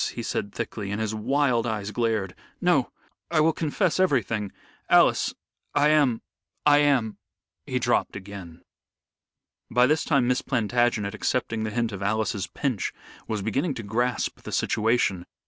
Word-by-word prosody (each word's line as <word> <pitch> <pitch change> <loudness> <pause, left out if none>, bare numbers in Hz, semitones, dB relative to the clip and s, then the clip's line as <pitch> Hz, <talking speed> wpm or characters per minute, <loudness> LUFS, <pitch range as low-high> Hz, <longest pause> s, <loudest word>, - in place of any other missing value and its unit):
he - - -4
said 100 - -3
thickly, 100 -1 -5
and 105 +1 -2
his 110 -1 -1
wild 120 +1 +1
eyes 105 -2 -3
glared. 110 -5 -1 0.3
"No. - - +2 0.4
I 165 - +2
will 160 +1 +4
confess 165 +4 0
everything. 115 - +1 0.4
Alice, - - +4 0.4
I 145 +1 +4
am 145 -7 +3 0.4
I 145 0 +6
am 135 -7 +2 0.2
" - - -59
He - - -1
dropped - - +1
again. 95 -4 -9 1.1
By 125 +1 +4
this 155 +4 +2
time 140 -5 +2
Miss 125 0 +1
Plantagenet, 120 -4 0
accepting 115 0 -1
the - - -2
hint 115 +1 -1
of 100 -2 -6
Alice's 105 -1 -1
pinch, 130 -8 -2 0.3
was 105 -3 -2
beginning 135 - -1
to 115 - -6
grasp 120 +4 -1
the - - -8
situation. 110 -5 +1
115 Hz, 150 wpm, -25 LUFS, 105-135 Hz, 1.1 s, I